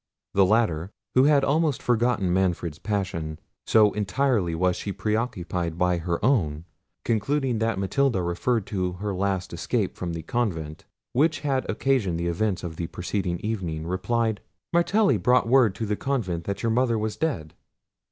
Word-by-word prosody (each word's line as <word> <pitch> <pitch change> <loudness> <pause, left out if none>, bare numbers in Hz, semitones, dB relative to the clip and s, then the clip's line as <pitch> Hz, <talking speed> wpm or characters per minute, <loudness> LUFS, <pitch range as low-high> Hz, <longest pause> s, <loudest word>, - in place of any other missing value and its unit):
The 95 -1 +5
latter, 95 -6 +1 0.2
who 130 +1 +5
had 145 -2 +5
almost 150 0 +2
forgotten 120 -6 +1
Manfred's 90 -4 0
passion, 90 -7 -3 0.3
so 105 -2 +5
entirely 105 -4 0
was 90 +1 +1
she 100 - -5 0.2
occupied 90 -7 -2
by 90 -1 +2
her 85 0 -1
own, 85 - +1 0.4
concluding 125 +2 0
that 115 -3 0
Matilda 100 +1 +1
referred 95 +6 0
to 90 -4 -2
her 100 +3 -4
last 95 -1 -1
escape - - -1
from 85 -2 -4
the 80 -1 -5
convent, 80 -8 -2 0.3
which 155 +4 +2
had 135 -3 -1
occasioned 110 -7 +1
the 85 - -2
events 95 +2 -1
of 80 -2 -6
the 85 - -3
preceding 90 0 -2
evening, 90 -8 -3
replied— 110 +4 -1 0.3
"Martelli 195 +5 +3
brought 125 -2 +3
word 120 -5 +4
to 110 - -3
the 105 0 0
convent 100 -11 -2
that 100 +3 -4
your 115 - +2
mother 120 0 +2
was 110 0 -2
dead." 95 - -2
100 Hz, 160 wpm, -25 LUFS, 90-120 Hz, 0.4 s, The